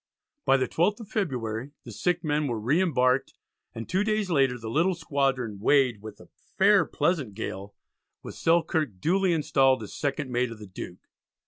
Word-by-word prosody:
By 135 - +5
the 130 -1 0
12th 200 +7 +1
of 210 - -11
February 130 - -3
the - - -10
sick 180 -1 -1
men 150 -1 0
were 120 -4 -2
re 135 - +2
embarked, 130 -7 +1 0.4
and 115 -1 -6
two 190 +3 +1
days 215 -3 -1
later 135 -5 +2
the 115 -1 -8
little 165 +10 +1
squadron 135 - -1
weighed 125 -2 +3
with 110 0 -10
"a - - -16 0.3
fair - - +5
pleasant 140 - -1
gale," 100 -2 -6 0.5
with - - -8
Selkirk 160 - +1
duly 185 - +2
installed 135 -6 +2
as 105 - -9
second 140 -2 -3
mate 125 0 0
of 115 - -8
the 105 - -10
Duke. 90 -2 -9
135 Hz, 180 wpm, -27 LUFS, 115-165 Hz, 0.5 s, By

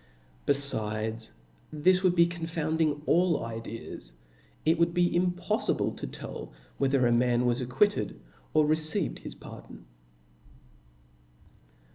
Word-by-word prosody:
Befid^, 110 -5 0 0.4
this 180 +5 +3
would 185 -2 +3
be 170 -1 +6
(ionfotinding 160 -3 -1
all 175 -6 +2
ideas 115 - -7 0.3
\ - - -32
it 160 +1 +3
would 170 +1 +2
be 175 0 +3
impoffible 180 +1 0
to - - -5
tell - - -8 0.3
whether 135 -2 +3
a 120 - +3
man 120 +1 +3
was 120 +1 +1
ac 125 - -4
quitted, 205 +11 +1 0.3
or 155 - +4
received 155 - +1
his - - -9
pardon. - - -12
150 Hz, 120 wpm, -28 LUFS, 120-170 Hz, 0.4 s, be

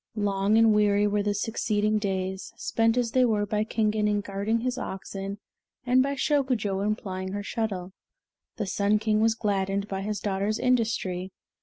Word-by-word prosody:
Long 200 +1 +2
and 225 -1 +6
weary 205 -1 +3
were 205 0 +1
the 205 0 0
succeeding 215 0 0
days, 190 -2 -3
spent 225 +1 +1
as 240 -2 +1
they 255 +1 +4
were 215 -4 +2
by 210 +1 0
Kingen 215 -1 0
in 205 0 +1
guiding 205 +3 -1
his 250 0 -1
oxen 195 -1 -5 0.5
and 250 +1 +4
by 280 +1 0
Shokujo 255 -10 0
in 210 +1 +1
plying 190 -2 -5
her 205 0 -3
shuttle. 195 -4 -3 0.6
The 210 - -1
Sun 200 +2 +2
King 215 0 +1
was 225 0 +3
gladdened 200 -2 -1
by 195 -1 -3
his 210 +1 -3
daughter's 205 +2 -1
industry. 225 -7 0
210 Hz, 170 wpm, -27 LUFS, 195-225 Hz, 0.6 s, and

